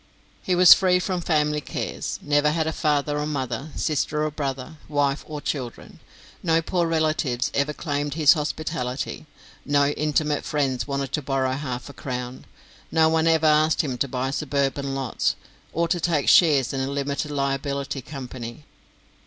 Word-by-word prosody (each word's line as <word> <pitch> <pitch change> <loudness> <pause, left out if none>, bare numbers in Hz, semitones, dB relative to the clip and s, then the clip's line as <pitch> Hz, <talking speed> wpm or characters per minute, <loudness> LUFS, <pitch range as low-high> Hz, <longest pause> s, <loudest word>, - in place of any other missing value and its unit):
He 185 - 0
was 180 0 +10
free 185 -2 +3
from 180 0 -2
family 150 -2 +1
cares - - -4
never 145 0 +3
had 160 +1 0
father 150 -1 0
or 150 - -2
mother, 135 -1 -3
sister 150 0 0
or 155 - -1
brother, 140 +1 -4
wife 145 -1 0
or 150 -2 -6
children. 130 -6 -5 0.4
No 165 -1 +2
poor 170 +1 0
relatives 155 -6 0
ever 140 +2 +1
claimed 145 -1 -3
his 155 -3 +6
hospitality; 150 -3 -3 0.4
no 145 0 +2
intimate 150 0 0
friends 135 -6 -1
wanted 140 -1 -2
to 150 - -1
borrow 135 -1 0
half 130 -3 -4
a 140 - -10
crown; 125 -2 -6 0.5
no 160 -1 +4
one 160 0 +2
ever 160 -1 +3
asked 155 +1 +4
him 135 -5 -3
to 140 - +1
buy 130 +1 -2
suburban 140 -1 -1
lots, 135 -4 -1 0.4
or 170 0 0
to 175 0 +1
take 160 -4 0
shares 145 -8 +5
in 135 - -2
a 130 - -1
limited 140 +1 -2
liability 140 0 -2
company. 130 0 -8
145 Hz, 160 wpm, -24 LUFS, 135-155 Hz, 0.5 s, was